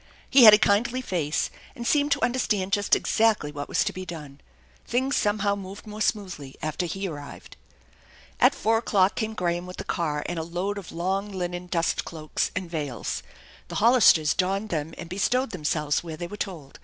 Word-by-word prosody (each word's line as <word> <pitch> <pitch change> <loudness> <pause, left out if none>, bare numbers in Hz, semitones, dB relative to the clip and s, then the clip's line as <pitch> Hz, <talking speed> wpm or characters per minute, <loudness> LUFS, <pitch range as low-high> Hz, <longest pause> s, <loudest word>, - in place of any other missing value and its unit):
He 265 -3 +7
had 215 - +11
a - - +3
kindly 220 +4 +2
face, 170 - -1 0.2
and 240 -3 -6
seemed 290 +2 +2
to - - -3
understand 215 -6 0
just 205 -1 +3
exactly 220 -9 +1
what 145 -1 -6
was - - +2
to - - -2
be 185 - -6
done. 150 -6 -9 0.4
Things 260 +4 0
somehow 205 -1 +1
moved 195 +1 -9
more 215 0 -8
smoothly 185 -11 -2
after 155 +3 -2
he 195 +4 -3
arrived. 145 -4 -9 0.8
At - - +5
four 225 +2 +2
o'clock 200 -3 +2
came 220 -1 -3
Graham 175 -1 -1
with 180 - -9
the - - -5
car 150 -4 -2
and 175 -1 -3
a - - -2
load 180 +5 -3
of 190 - -10
long 195 +4 -2
linen 180 -1 -4
dust 170 -2 0
cloaks 155 -2 -3
and 185 - -3
veils. 150 -7 -4 0.5
The - - -7
Hollisters 210 -9 +5
donned 195 +3 0
them 160 0 -3
and - - -7
bestowed 225 +8 0
themselves 150 -3 -1
where 160 -2 -7
they 175 - -4
were 205 - -7
told. 170 -10 -6
185 Hz, 190 wpm, -26 LUFS, 165-210 Hz, 0.8 s, had